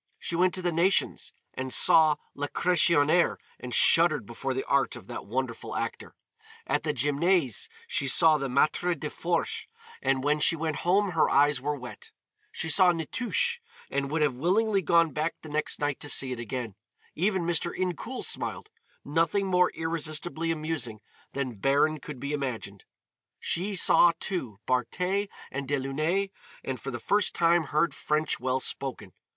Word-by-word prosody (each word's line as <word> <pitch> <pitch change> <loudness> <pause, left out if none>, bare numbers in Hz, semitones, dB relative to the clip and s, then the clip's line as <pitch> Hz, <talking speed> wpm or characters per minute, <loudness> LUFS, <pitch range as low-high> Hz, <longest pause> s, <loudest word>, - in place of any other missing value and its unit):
She 170 - -4
went 180 +1 +2
to 185 - -4
the 175 - +1
Nations 170 +4 +1 0.2
and 130 0 -5
saw 155 +1 +6 0.2
Lacressonière 170 +2 +3 0.2
and 125 0 -7
shuddered 155 0 +4
before 130 +4 -4
the 130 - -2
art 140 0 +1
of - - -11
that - - -8
wonderful 125 +1 -4
actor. - - -5 0.5
At - - 0
the - - -1
Gymnase 145 - +1 0.2
she 140 - -1
saw 155 +2 +5
the 135 - -2
"Maître 155 +5 +1
des 150 - -4
Forges" 170 - -2 0.3
and 135 -1 0
when 150 +1 +2
she 160 - +3
went 160 -2 -3
home 195 +3 +1
her 165 - +2
eyes 145 -1 +3
were 150 +2 -1
wet; 125 -5 -10 0.4
she - - -4
saw 180 +2 +5
"Nitouche" 240 - -1 0.3
and 140 0 -1
would 155 +1 +1
have 145 -3 +1
willingly 195 - +1
gone 170 -1 +3
back 155 +2 -2
the 155 - -9
next 150 +1 -1
night 145 -2 -1
to 145 - -5
see 130 -2 +3
it 125 - -4
again; 120 -1 -5 0.4
even 190 +1 0
Mr. 170 0 +2
Incoul 185 - -4
smiled; 430 - -4 0.3
nothing 165 +7 +1
more 180 -1 +3
irresistibly 160 0 -2
amusing 155 -8 -2 0.3
than 130 -6 -4
Baron 145 +6 +2
could 145 -2 -9
be 140 +3 -4
imagined; 120 -8 -4 0.5
she 195 +4 -2
saw, 175 -1 +5
too, 130 - -4
Bartet 180 - -1 0.2
and 140 0 -4
Delaunay, 155 +8 -1 0.3
and 130 -2 -4
for 135 - -6
the 120 - -4
first 205 - +1
time 170 -1 +3
heard 150 +4 +1
French 155 +1 -1
well 130 +1 0
spoken. 135 0 -4
155 Hz, 160 wpm, -27 LUFS, 135-175 Hz, 0.5 s, saw